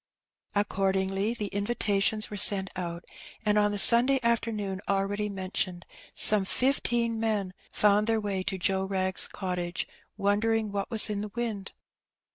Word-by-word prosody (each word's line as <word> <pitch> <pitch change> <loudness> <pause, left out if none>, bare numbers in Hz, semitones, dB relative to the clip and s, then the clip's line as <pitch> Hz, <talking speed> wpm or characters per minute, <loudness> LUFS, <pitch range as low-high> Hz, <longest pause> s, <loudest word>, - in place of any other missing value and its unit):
Accordingly 195 +1 -1
the 215 - -4
invitations 205 0 -1
were - - -5
sent 195 -1 +2
out, 170 -1 -6 0.4
and 210 0 +2
on 205 0 +2
the 205 - -3
Sun 235 +4 +7
day 275 -1 +2
afternoon 215 -5 -1
already 200 +1 -1
mentioned 185 -2 -4 0.3
some 210 -2 +8
fifteen 235 0 0
men 210 -4 -2 0.2
found 210 +1 +2
their 225 -1 +1
way 200 -3 -3
to 190 +1 -3
Joe 190 +1 0
Wrag's 190 -1 0
cottage, 180 -2 -4 0.3
wondering 215 +1 0
what 200 -1 -4
was 225 -3 +4
in 205 -1 -3
the 210 -1 -7
wind. 220 -5 -4
205 Hz, 145 wpm, -27 LUFS, 190-220 Hz, 0.4 s, some